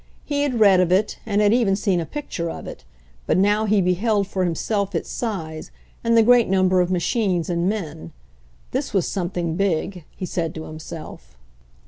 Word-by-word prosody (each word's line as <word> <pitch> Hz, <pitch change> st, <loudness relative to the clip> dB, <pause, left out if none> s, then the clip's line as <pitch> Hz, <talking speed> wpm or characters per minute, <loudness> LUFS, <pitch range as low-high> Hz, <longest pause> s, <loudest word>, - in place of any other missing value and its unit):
He 285 Hz, -1 st, -1 dB
had 265 Hz, -5 st, 0 dB
read 200 Hz, -4 st, +6 dB
of 180 Hz, -1 st, +2 dB
it, 195 Hz, +3 st, +1 dB
and 205 Hz, -1 st, +2 dB
had 205 Hz, +1 st, +4 dB
even 230 Hz, -5 st, +3 dB
seen 195 Hz, -3 st, +1 dB
a 165 Hz, -, -4 dB
picture 230 Hz, -, -4 dB
of -, -, -7 dB
it, -, -, -9 dB, 0.4 s
but -, -, +2 dB
now 205 Hz, +3 st, +3 dB
he 210 Hz, -2 st, +3 dB
beheld 200 Hz, +3 st, +1 dB
for 190 Hz, -1 st, -3 dB
him 170 Hz, -2 st, 0 dB
self 200 Hz, 0 st, -1 dB
its 165 Hz, -, -3 dB
size 165 Hz, -9 st, -4 dB, 0.3 s
and 230 Hz, 0 st, +3 dB
the 225 Hz, -, +7 dB
great 240 Hz, -1 st, +5 dB
number 185 Hz, -1 st, +3 dB
of 180 Hz, -, 0 dB
machines 180 Hz, -1 st, 0 dB
and 170 Hz, +2 st, +1 dB
men. 155 Hz, -, -5 dB, 0.6 s
This -, -, -3 dB
was 190 Hz, -, +2 dB
something 175 Hz, -3 st, -2 dB
big, 185 Hz, -1 st, -1 dB
he 185 Hz, -, -5 dB
said 165 Hz, -3 st, -3 dB
to 160 Hz, -, -5 dB
himself. 155 Hz, -, -10 dB
190 Hz, 190 wpm, -22 LUFS, 170-210 Hz, 0.6 s, the